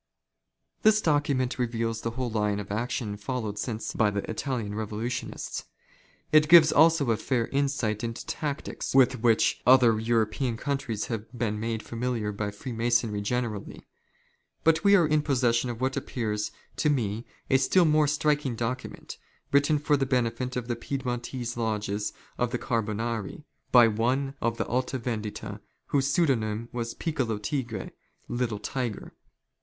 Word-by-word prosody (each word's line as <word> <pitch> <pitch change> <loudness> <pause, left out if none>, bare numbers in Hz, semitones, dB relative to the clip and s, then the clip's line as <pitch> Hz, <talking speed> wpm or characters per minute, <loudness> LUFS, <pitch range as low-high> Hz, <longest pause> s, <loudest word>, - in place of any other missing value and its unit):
This 215 0 +5
document 145 -7 +1
reveals 115 -2 -1
the 115 - -2
whole 125 -2 -2
line 105 -2 0
of 100 -1 -7
action 110 -1 -2
followed 105 -1 -4
since 110 0 -3
by 110 - +3
the 100 -1 -3
Italian 115 -3 -3
Revolutionists. 110 +3 -4 0.7
It 155 0 +5
gives 165 -2 +9
also 155 -4 +5
a 110 - +2
fair 120 -1 0
insight 135 -6 0
into 115 0 -4
tactics 145 -3 -4
with 130 -1 +5
which 115 -2 +3
other 125 -3 +6
European 115 +1 0
countries 130 -6 -2
have 115 -1 -5
been 110 -3 -1
made 115 0 -2
familiar 115 -3 -2
by 105 0 -3
Freemasonry 115 -1 -1
generally. 110 -1 -3 0.8
But 165 +2 +3
we 200 0 +7
are 175 -4 +5
in 155 0 +2
posses 125 -5 +2
sion 125 +1 -1
of 115 -1 -5
what 130 0 0
appears 105 -4 -2 0.3
to 150 - +2
me 115 -5 -1 0.2
a 135 - +6
still 170 +7 +4
more 155 -1 +4
striking 150 -3 +1
document, 120 +3 -5 0.3
written 145 +2 +4
for 145 0 +2
the 135 -1 0
benefit 125 0 0
of 125 -2 -3
the 120 - -1
Piedmontese 120 -1 -4
lodges 105 -2 -1 0.3
of 125 - +1
Carbonari, 115 0 -2 0.3
by 120 -2 +8
one 125 +5 0
of 115 0 0
the - - -1
Alta 125 +2 -1
Vendita, 110 -4 -5 0.3
whose 140 -1 +2
pseudonym 115 -8 +1
was 115 -1 -4
Piccolo 130 -10 -1
Tigre 120 0 -3 0.2
— - - -38
Little 115 -4 0
Tiger. 115 +2 -4
120 Hz, 150 wpm, -27 LUFS, 110-135 Hz, 0.8 s, gives